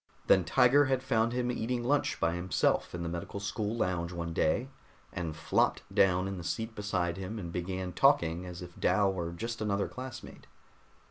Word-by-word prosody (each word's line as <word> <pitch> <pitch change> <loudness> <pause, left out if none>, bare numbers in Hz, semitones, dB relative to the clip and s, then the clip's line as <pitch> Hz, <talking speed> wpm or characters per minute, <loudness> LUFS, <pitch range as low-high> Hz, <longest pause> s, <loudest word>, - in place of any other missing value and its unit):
Then 95 - +5
Tiger 130 - +5
had 130 -1 0
found 115 -3 +2
him 125 0 0
eating 120 0 -2
lunch 140 +4 +1
by 85 - +1
himself 90 0 0
in 85 - -4
the - - -3
medical 85 +4 -5
school 105 +2 -2
lounge 90 -5 -1
one 85 -1 -4
day 100 +12 +1 0.5
and 85 -3 -3
flopped 80 - +1
down 95 -1 +3
in 95 -2 -4
the - - -7
seat 110 +6 -3
beside 95 -5 -1
him 95 +4 -5
and 85 -5 -5
began 90 +1 -3
talking 85 +2 +3
as 90 0 -7
if 90 -1 -12
Dal 100 -2 +3
were 85 -2 -3
just 115 +7 -5
another 100 -2 0
classmate. 130 0 -9
95 Hz, 185 wpm, -31 LUFS, 85-115 Hz, 0.5 s, Then